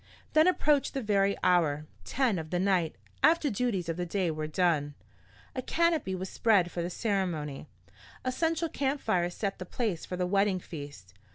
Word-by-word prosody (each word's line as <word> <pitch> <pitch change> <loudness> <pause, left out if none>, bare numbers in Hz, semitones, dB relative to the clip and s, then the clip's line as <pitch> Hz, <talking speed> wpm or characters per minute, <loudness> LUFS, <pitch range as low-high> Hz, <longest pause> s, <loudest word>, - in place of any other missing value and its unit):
Then 310 +2 +6
approached 300 -7 +2
the 270 - -1
very 200 -2 +2
hour 155 -5 +3 0.2
ten 250 -9 +1
of 160 -1 -7
the 180 - 0
night, 180 -4 +1 0.3
after 305 0 +4
duties 200 -5 -1
of 165 0 -2
the 180 - -2
day 180 -1 0
were 155 0 -3
done. 155 -3 +1 0.6
A 255 - -1
canopy 320 - +1
was 185 +1 -4
spread 190 -4 +2
for 175 - -3
the 170 - -2
ceremony. 175 -9 -2 0.6
A 255 - +1
central 325 +4 0
camp 280 0 -1
fire 180 -7 +1
set 195 +2 -3
the - - -4
place 210 -8 -2
for 180 - -5
the 180 - 0
wedding 195 0 +2
feast. 145 - -9
190 Hz, 180 wpm, -29 LUFS, 170-250 Hz, 0.6 s, Then